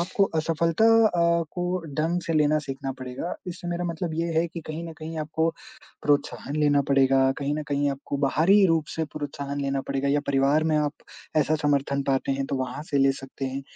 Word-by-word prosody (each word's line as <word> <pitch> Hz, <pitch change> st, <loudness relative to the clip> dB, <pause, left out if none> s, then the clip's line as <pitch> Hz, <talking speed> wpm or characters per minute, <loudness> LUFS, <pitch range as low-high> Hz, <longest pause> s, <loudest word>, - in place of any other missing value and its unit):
आपको 190 Hz, +3 st, +2 dB
असफलता 165 Hz, +5 st, +1 dB, 0.2 s
अ, 170 Hz, -3 st, +2 dB
को 180 Hz, 0 st, -2 dB, 0.2 s
ढंग 170 Hz, +3 st, 0 dB
से 165 Hz, -, 0 dB
लेना 155 Hz, 0 st, +3 dB
सीखना 135 Hz, 0 st, -4 dB
पड़ेगा। 130 Hz, +7 st, -4 dB
इससे 175 Hz, 0 st, -6 dB
मेरा 175 Hz, +1 st, -2 dB
मतलब 170 Hz, -1 st, -3 dB
ये 165 Hz, +1 st, -1 dB
है 170 Hz, -, +2 dB
कि 170 Hz, -, -7 dB
कहीं 155 Hz, +2 st, -5 dB
न 165 Hz, -, -7 dB
कहीं 160 Hz, 0 st, -6 dB
आपको 160 Hz, +2 st, 0 dB, 0.5 s
प्रोत्साहन 145 Hz, 0 st, 0 dB
लेना 145 Hz, -2 st, +3 dB
पड़ेगा, 135 Hz, -1 st, +4 dB
कहीं 145 Hz, +1 st, -1 dB
न 155 Hz, -, -2 dB
कहीं 145 Hz, 0 st, +1 dB
आपको 140 Hz, +1 st, -4 dB
बाहरी 190 Hz, +9 st, +4 dB
रूप 165 Hz, -2 st, +1 dB
से 160 Hz, -, 0 dB
प्रोत्साहन 140 Hz, -1 st, -4 dB
लेना 135 Hz, -1 st, -1 dB
पड़ेगा, 140 Hz, 0 st, 0 dB
या 145 Hz, +1 st, +2 dB
परिवार 140 Hz, +3 st, +3 dB
में 155 Hz, -1 st, +2 dB
आप 150 Hz, -1 st, +1 dB, 0.4 s
ऐसा 155 Hz, +1 st, +3 dB
समर्थन 140 Hz, -1 st, +1 dB
पाते 135 Hz, 0 st, 0 dB
हैं, 135 Hz, 0 st, -2 dB
तो 140 Hz, -, -2 dB
वहाँ 130 Hz, +3 st, -4 dB
से 140 Hz, -, +2 dB
ले 135 Hz, 0 st, +4 dB
सकते 135 Hz, 0 st, -7 dB
हैं। 135 Hz, +1 st, -4 dB
150 Hz, 200 wpm, -25 LUFS, 140-165 Hz, 0.5 s, पड़ेगा